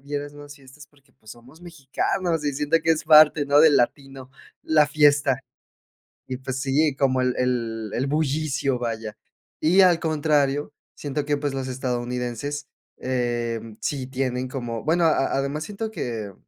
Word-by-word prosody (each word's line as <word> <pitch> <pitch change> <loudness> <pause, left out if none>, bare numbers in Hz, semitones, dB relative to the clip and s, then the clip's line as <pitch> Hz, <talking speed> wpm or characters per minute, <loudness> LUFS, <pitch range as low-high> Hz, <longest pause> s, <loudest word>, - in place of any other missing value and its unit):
vieras 145 0 -5
más 145 0 -12
fiestas 140 +2 -16
porque, 140 -1 -29
pues, 110 - -16
somos 130 +8 -17
mexicanos 165 +1 -2
y 145 - 0
siento 150 +4 +1
que 165 - +1
es 155 -1 +1
parte, 155 -1 +6
¿no?, 145 +1 +5
del 155 -2 +6
latino, 135 +1 -2 0.3
la 150 -2 +3
fiesta. 145 -3 +3 0.9
Y, 130 -1 -5
pues, 130 0 -5
sí, 140 +1 +1
como 130 -2 +1
el 125 -1 0
el 115 -4 -2
el 130 +4 -1
bullicio, 140 -3 -1
vaya. 110 -2 -4 0.4
Y 180 +5 +5
al 175 -2 +4
contrario, 150 -2 0 0.2
siento 145 0 -3
que, 145 0 0
pues, 145 -1 -3
los 130 -1 -4
estadounidenses, 125 +2 -4 0.3
em, 120 -3 -3
sí 135 -3 -3
tienen 130 -1 -2
como, 120 -3 -5
bueno, 170 +2 +2
a 155 -4 +2
además 140 +3 -2
siento 215 +2 -5
que, 110 - -5
140 Hz, 155 wpm, -23 LUFS, 125-150 Hz, 0.9 s, parte